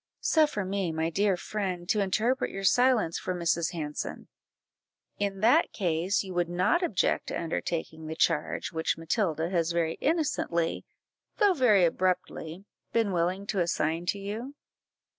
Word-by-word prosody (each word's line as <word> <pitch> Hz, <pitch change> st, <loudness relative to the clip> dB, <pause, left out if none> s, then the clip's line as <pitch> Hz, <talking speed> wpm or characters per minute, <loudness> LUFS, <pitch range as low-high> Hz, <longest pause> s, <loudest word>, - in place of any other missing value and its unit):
"Suffer 300 Hz, -, +2 dB
me, 190 Hz, -2 st, -1 dB
my 160 Hz, +1 st, -1 dB
dear 195 Hz, +1 st, +2 dB
friend, 185 Hz, -3 st, -4 dB
to 215 Hz, -, +2 dB
interpret 215 Hz, +6 st, +1 dB
your 195 Hz, -, -6 dB
silence 235 Hz, -3 st, +3 dB
for 185 Hz, -, -3 dB
Mrs. 170 Hz, -1 st, 0 dB
Hanson; 150 Hz, -3 st, -5 dB, 0.9 s
in 200 Hz, -1 st, -2 dB
that 250 Hz, +10 st, +4 dB
case 180 Hz, +1 st, 0 dB
you 190 Hz, -1 st, -7 dB
would 175 Hz, -1 st, 0 dB
not 185 Hz, -, +2 dB
object 225 Hz, -, 0 dB
to -, -, -3 dB
undertaking 160 Hz, -1 st, -3 dB
the 160 Hz, -, -4 dB
charge 165 Hz, -1 st, 0 dB
which 160 Hz, -1 st, -1 dB
Matilda 165 Hz, -1 st, -1 dB
has 170 Hz, -2 st, +1 dB
very 165 Hz, -1 st, -1 dB
innocently, 285 Hz, -, 0 dB, 0.5 s
though 410 Hz, -3 st, +4 dB
very 220 Hz, -, +4 dB
abruptly, 180 Hz, 0 st, -2 dB, 0.3 s
been 225 Hz, -3 st, +1 dB
willing 180 Hz, +3 st, 0 dB
to 200 Hz, -1 st, -2 dB
assign 170 Hz, 0 st, 0 dB
to 200 Hz, -, 0 dB
you?" 220 Hz, +8 st, -6 dB
185 Hz, 145 wpm, -28 LUFS, 165-210 Hz, 0.9 s, that